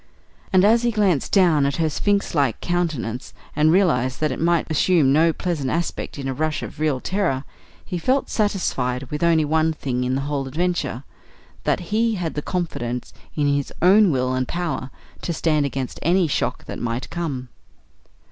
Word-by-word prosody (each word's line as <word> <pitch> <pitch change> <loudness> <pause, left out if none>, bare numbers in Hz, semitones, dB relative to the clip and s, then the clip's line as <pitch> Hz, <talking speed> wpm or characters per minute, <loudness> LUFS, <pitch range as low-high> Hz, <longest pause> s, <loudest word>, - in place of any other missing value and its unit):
And, 185 0 +5
as 230 +2 +5
he 240 - +2
glanced 205 - +1
down 175 -7 +4
at 140 0 +1
her 165 -1 +1
sphinx 200 +6 0
like 140 -7 +1
countenance 155 -10 -2 0.2
and 155 +1 +4
realised 130 -9 +2
that 155 -2 +1
it 130 - -4
might 170 -1 +2
assume 155 -3 +3
no 165 +3 +4
pleasant 160 -5 -2
aspect 170 0 -3
in 135 -1 -4
a 135 - -1
rush 155 +3 -2
of - - -8
real 150 -4 +1
terror, 175 -6 -1 0.4
he 180 -3 -4
felt 260 +10 +1
satisfied 135 - -1
with 150 - -3
only 165 -2 +3
one 160 +1 +2
thing 125 -4 -2
in 125 +1 0
the 135 - -1
whole 140 -1 -2
adventure 165 -4 -2 0.6
that 175 - -1
he 225 +1 +2
had 175 -4 -3
confidence 125 -9 -3 0.2
in 150 - +1
his 140 -1 0
own 195 +3 +6
will 130 -2 0
and 130 -1 -1
power 170 -6 -3 0.3
to 170 - -2
stand 155 -3 +1
against 135 -2 -4
any 180 +3 +3
shock 140 - -2
that - - -6
might 120 +1 -3
come. 140 -8 -4
155 Hz, 175 wpm, -22 LUFS, 135-180 Hz, 0.6 s, own